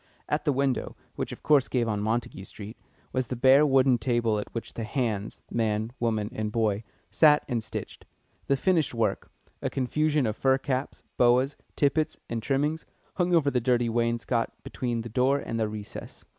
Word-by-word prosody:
At 150 +1 -1
the 150 - +3
window, 135 -1 0 0.2
which, - - -3
of - - -9
course, 145 -3 +4
gave 120 -3 0
on 105 -2 -1
Montague 110 -3 -2
Street, 105 +3 -9 0.4
was 130 -1 0
the 125 - -3
bare 135 +4 +6
wooden 130 -2 +4
table 115 -3 +1
at - - -6
which 115 - -6
the 115 - -4
"hands" 110 -3 -2
man, 110 -1 0
woman, 110 -2 0
and 110 -3 -3
boy 110 -2 0 0.3
sat 150 -2 +5
and 120 -5 -1
stitched. 110 - -7 0.4
The 140 - +2
finished 165 -6 +1
work 115 - -1 0.3
a - - -1
confusion 150 +2 +1
of 110 -1 -1
fur 130 +1 +3
caps, 135 0 -3
boas, 125 +3 +4 0.2
tippets, 150 +2 +1
and 115 -1 -2
trimmings 145 +6 0 0.3
hung 180 -1 +2
over 145 -4 +3
the 125 - +1
dirty 120 -1 +2
wainscot 115 0 0
between 120 -2 -3
the 115 - -6
door 130 +5 +2
and 115 -4 -4
the 110 -1 0
recess. 105 -1 -8
120 Hz, 180 wpm, -27 LUFS, 115-140 Hz, 0.4 s, bare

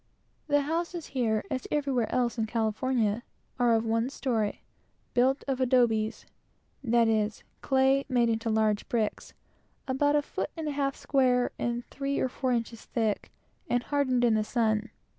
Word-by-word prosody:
The 290 -1 +3
houses 335 +3 -2
here, 225 -5 +1
as 260 -1 -3
everywhere 275 -6 0
else 245 -2 +1
in 220 - 0
California, 225 0 0 0.4
are 240 -2 +4
of 225 0 0
one 230 +2 +1
story, 230 -7 -2 0.5
built 260 +3 +2
of 265 -1 -1 2.0
clay 270 0 +3
made 240 -3 +3
into 225 0 -1
large 215 -1 +1
bricks, 220 -3 -2 0.5
about 290 +3 +2
a 295 - +3
foot - - -4
and 320 -1 -3
a - - 0
half 275 -1 -1
square 250 -3 +2
and 240 0 -2
three 280 0 -2
or 260 - +1
four 255 +1 -2
inches 230 -1 -2
thick, 220 -4 -1 0.4
and 245 0 +1
hardened 260 -4 +1
in 235 - +4
the 215 0 +2
sun. 220 -1 0
245 Hz, 145 wpm, -28 LUFS, 225-275 Hz, 2.0 s, are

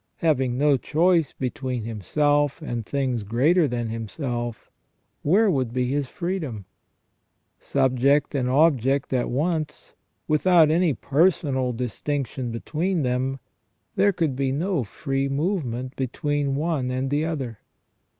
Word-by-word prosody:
Having 130 -6 +1
no 145 0 +4
choice 165 +3 +2
between 130 -2 -3
himself 145 - +1
and 120 -8 -4
things 130 -1 -1
greater 145 - +3
than 120 -2 -2
himself, 120 +1 -4 0.5
where 200 +9 +4
would 130 -7 0
be 125 0 -1
his 140 -1 -1
freedom? 155 - -4 0.9
Subject 135 +2 +2
and 130 -3 0
object 135 -2 +2
at 125 -2 0
once, 155 +3 -2 0.3
without 160 0 +4
any 165 -3 +2
personal 140 - +1
distinction 125 +2 -3
between 160 +8 -1
them, 130 +1 -1 0.6
there 200 - +4
could 160 -7 -1
be 135 0 0
no 160 +1 0
free 135 +5 -2
move 165 +6 0
ment 125 +2 -5
between 140 +1 -1
one 150 -4 -1
and 130 +1 -2
the 145 +2 +1
other. 135 -9 -4
135 Hz, 125 wpm, -24 LUFS, 125-155 Hz, 0.9 s, no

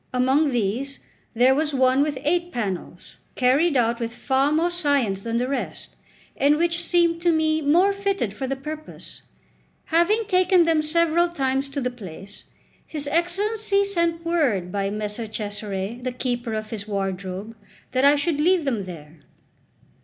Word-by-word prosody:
Among 265 +4 +2
these 245 +4 -2 0.4
there 250 +3 +5
was 300 +1 0
one 260 +1 +3
with 290 -2 0
eight 345 +4 +1
panels, 195 - -5 0.2
carried 275 +5 +3
out 235 -1 +1
with 230 -1 -3
far 270 +3 +1
more 330 +3 +1
science 285 - +1
than 230 +2 -2
the 250 +1 0
rest, 275 0 -5 0.4
and 285 +2 +3
which 340 +1 +1
seemed 340 -1 +2
to 345 0 +3
me 315 -1 +1
more 345 +7 +3
fitted 395 - -1
for 265 +5 -4
the 270 - -2
purpose. 305 +3 -8 0.6
Having 375 +7 +2
taken 365 -1 +4
them 325 -2 +3
several 335 +2 +2
times 270 -3 -1
to 280 +1 -4
the 250 0 -1
place, 195 -3 -11 0.4
his 295 -2 -4
Excellency 400 +5 +1
sent 340 -3 -1
word 255 - 0
by 195 0 -1
Messer 210 +2 -4
Cesare, 205 0 -4
the 255 0 -3
keeper 245 -2 -3
of 215 0 -5
his 215 -2 -5
wardrobe, 195 +1 -4 0.4
that 255 +1 +1
I 285 +1 +7
should 295 +1 0
leave 350 0 +3
them 230 -8 -1
there. 160 -3 -11
275 Hz, 160 wpm, -23 LUFS, 225-335 Hz, 0.6 s, I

